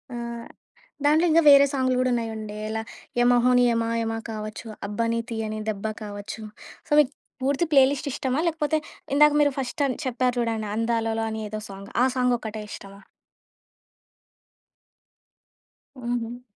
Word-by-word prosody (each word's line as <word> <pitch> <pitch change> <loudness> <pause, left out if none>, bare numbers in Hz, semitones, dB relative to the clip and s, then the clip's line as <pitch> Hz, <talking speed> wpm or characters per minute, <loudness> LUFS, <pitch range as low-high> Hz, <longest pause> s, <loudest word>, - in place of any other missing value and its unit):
ఆహ్, 235 -1 -6 0.6
దాంట్లో 310 +4 +4
ఇంకా 330 - +6
వేరే 280 0 +9
సాంగ్‌లు 260 -2 +1
కూడా 255 - +2
ఉన్నాయండి. 220 -2 -4
ఇలా 220 0 -2 0.4
'యమహోని 245 +1 +4
యమా 230 0 0
యమ' 225 0 -2
కావొచ్చు, 215 +1 -6 0.2
'అబ్బని 230 +2 -1
తియని 215 -1 -3
దెబ్బ' 210 0 -3 0.2
కావొచ్చు. 205 +2 -7 0.4
సో, - - -22
మీకు 285 -3 +4 0.3
పూర్తి 280 +5 +1
ప్లే 275 -2 +7
లిస్ట్ 285 0 -3
ఇష్టమా? 260 +1 -1
లేకపోతే 315 -1 0 0.4
ఇందాక 300 +1 +6
మీరు 290 -1 +4
ఫస్ట్ 245 +1 -3
అన్ 255 - -3
చెప్పారు 250 0 0
చూడండి, 225 -2 -1
'అందాలలో' 225 0 0
అని 220 0 -4
ఏదో 215 0 -5
సాంగ్, 195 +1 -9
ఆ - - +5
సాంగ్ 250 -1 +3
ఒక్కటే 220 -1 -6
ఇష్టమా? 195 0 -10 3.0
హుహు. 240 0 -3
235 Hz, 140 wpm, -25 LUFS, 220-255 Hz, 3.0 s, వేరే